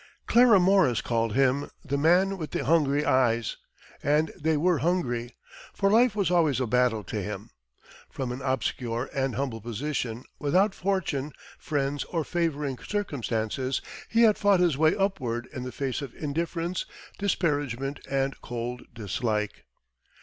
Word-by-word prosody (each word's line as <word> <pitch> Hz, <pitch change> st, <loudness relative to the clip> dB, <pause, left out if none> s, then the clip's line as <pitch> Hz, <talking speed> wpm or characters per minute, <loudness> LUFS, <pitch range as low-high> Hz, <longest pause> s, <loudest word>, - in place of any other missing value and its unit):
Clara 235 Hz, -4 st, +6 dB
Morris 180 Hz, -, +4 dB
called 115 Hz, -2 st, -1 dB
him 135 Hz, +1 st, +2 dB, 0.2 s
"The 140 Hz, -1 st, -1 dB
Man 180 Hz, +6 st, +3 dB
with 155 Hz, -, -4 dB
the -, -, -3 dB
Hungry 150 Hz, -3 st, +3 dB
Eyes," 120 Hz, -3 st, +2 dB, 0.4 s
and 150 Hz, +2 st, +2 dB
they 160 Hz, 0 st, 0 dB
were 170 Hz, 0 st, +2 dB
hungry, 125 Hz, -9 st, -1 dB, 0.4 s
for 195 Hz, -1 st, +2 dB
life 230 Hz, 0 st, +4 dB
was 200 Hz, -4 st, +1 dB
always 160 Hz, -7 st, +3 dB
a 130 Hz, -, +1 dB
battle 120 Hz, -2 st, +2 dB
to -, -, -4 dB
him. -, -, -6 dB, 0.6 s
From 130 Hz, -2 st, -4 dB
an 125 Hz, +2 st, -5 dB
obscure 125 Hz, -2 st, -2 dB
and 135 Hz, -2 st, -1 dB
humble 130 Hz, -4 st, -3 dB
position, 120 Hz, 0 st, -3 dB, 0.2 s
without 185 Hz, +8 st, +2 dB
fortune, 165 Hz, -8 st, -1 dB, 0.3 s
friends, 145 Hz, -1 st, -1 dB
or 165 Hz, -3 st, -2 dB
favoring 150 Hz, -6 st, -1 dB
circumstances 130 Hz, -, -2 dB, 0.3 s
he 230 Hz, +1 st, +4 dB
had 215 Hz, -2 st, +5 dB
fought 200 Hz, -2 st, +4 dB
his 175 Hz, -5 st, +3 dB
way 155 Hz, +2 st, +3 dB
upward 125 Hz, -, -1 dB
in 130 Hz, -, -5 dB
the 125 Hz, 0 st, -5 dB
face 135 Hz, -2 st, -3 dB
of 135 Hz, -4 st, -7 dB
indifference, 165 Hz, +4 st, -2 dB, 0.3 s
disparagement 145 Hz, -8 st, -1 dB
and 135 Hz, -1 st, -1 dB
cold 120 Hz, +1 st, -4 dB
dislike. 105 Hz, 0 st, -2 dB
140 Hz, 145 wpm, -27 LUFS, 125-175 Hz, 0.6 s, Clara